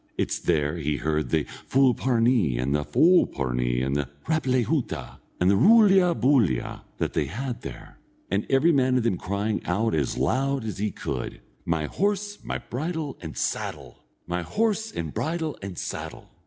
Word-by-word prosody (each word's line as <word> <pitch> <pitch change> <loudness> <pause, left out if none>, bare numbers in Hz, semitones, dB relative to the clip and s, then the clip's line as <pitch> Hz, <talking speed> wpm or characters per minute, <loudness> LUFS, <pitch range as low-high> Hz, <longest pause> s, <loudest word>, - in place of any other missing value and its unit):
It's - - -1
there 75 +1 0
he 75 -2 -1
heard 75 -1 -1
the 80 +2 +2 0.3
fulparnee, 120 - +3
and 65 +3 0
the 75 0 +1
folpornee, 65 - +2
the 70 -2 -1 0.2
rap 155 -3 0
lay 130 -1 +3
hoota, 115 - -3 0.2
and 90 - +2
the - - +4
roolya 195 - +5
boolya, 120 - +2 0.2
that - - -2
they - - +1
had 125 +4 -4
there, - - -10 0.3
and 100 +2 0
every 135 +6 +4
man 130 -3 +3
of 125 - +1
them 115 -5 +1
crying 100 +3 -2
out 110 +6 0
as 75 -5 0
loud 135 -2 0
as 105 -3 -5
he 105 +1 0
could: - - -5 0.3
"My 80 -2 0
horse, 205 - -1
and - - -4
bridle, 155 +1 -3
and 80 -3 -7
saddle! - - -4 0.2
My 90 +1 -2
horse, 220 - 0
and 80 -3 -5
bridle, 160 -1 -2
and 95 -3 -7
saddle!" - - -6
115 Hz, 165 wpm, -25 LUFS, -, 0.3 s, roolya